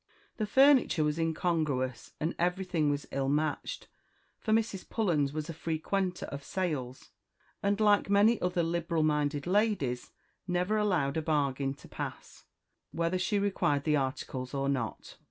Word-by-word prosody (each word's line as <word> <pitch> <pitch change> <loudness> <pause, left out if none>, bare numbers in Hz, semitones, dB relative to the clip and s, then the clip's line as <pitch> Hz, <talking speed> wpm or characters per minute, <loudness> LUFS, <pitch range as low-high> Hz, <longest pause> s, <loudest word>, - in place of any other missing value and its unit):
The 215 - -1
furniture 265 - +5
was 150 +2 0
incongruous, 155 -6 -1
and 160 +3 -1
everything 180 -3 +1
was 145 0 -1
ill 135 0 -1
matched 155 - -1 0.5
for 220 - -2
Mrs. 215 -3 0
Pullens 160 -11 +1
was 155 +1 -4
a 165 - -5
frequenter 180 +4 -2
of 140 0 -7
sales, 140 -9 -3 0.5
and, 200 +1 +1
like 205 -2 +4
many 205 +3 +4
other 180 -1 +1
liberal 170 -1 0
minded 150 -1 +1
ladies, 185 - +1 0.4
never 180 +4 +1
allowed 175 -9 +1
a - - +1
bargain 140 -3 0
to - - -15
pass, - - -7 0.4
whether 170 +3 -1
she 195 +3 +1
required 190 -8 +1
the 150 0 +2
articles 130 -1 -3
or 135 0 0
not. 125 -7 -3
165 Hz, 145 wpm, -30 LUFS, 145-195 Hz, 0.5 s, furniture